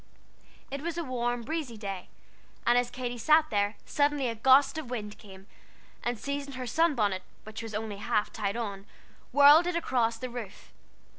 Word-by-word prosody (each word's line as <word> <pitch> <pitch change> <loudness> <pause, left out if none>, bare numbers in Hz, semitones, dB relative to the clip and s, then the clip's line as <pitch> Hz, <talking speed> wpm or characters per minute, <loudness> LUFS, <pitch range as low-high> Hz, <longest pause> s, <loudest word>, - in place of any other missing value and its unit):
It 280 0 -4
was 340 +1 -4
a 340 - -1
warm, 240 -3 -2
breezy 285 -4 -4
day, 195 -3 -6 0.6
and 240 - +4
as 245 0 +2
Katy 245 -1 -5
sat 310 +5 +5
here, 205 +1 +1
suddenly 290 -2 +1
a - - -2
gust 265 +6 +4
of 285 -6 -7
wind 210 -4 -5
came, 195 -3 -13 0.6
and 240 0 -1
seizing 280 +3 -4
her 255 0 -4
sun 325 +5 +2
bonnet, 200 -5 0 0.2
which 215 +1 -7
was 225 -2 -6
only 215 -1 -4
half 210 +1 -1
tied 205 0 -2
on, 200 -4 -5 0.4
whirled 290 +5 +7
it 355 - -1
across 240 -8 +1
the 255 - -5
roof. 230 -5 -9
240 Hz, 175 wpm, -29 LUFS, 215-280 Hz, 0.6 s, whirled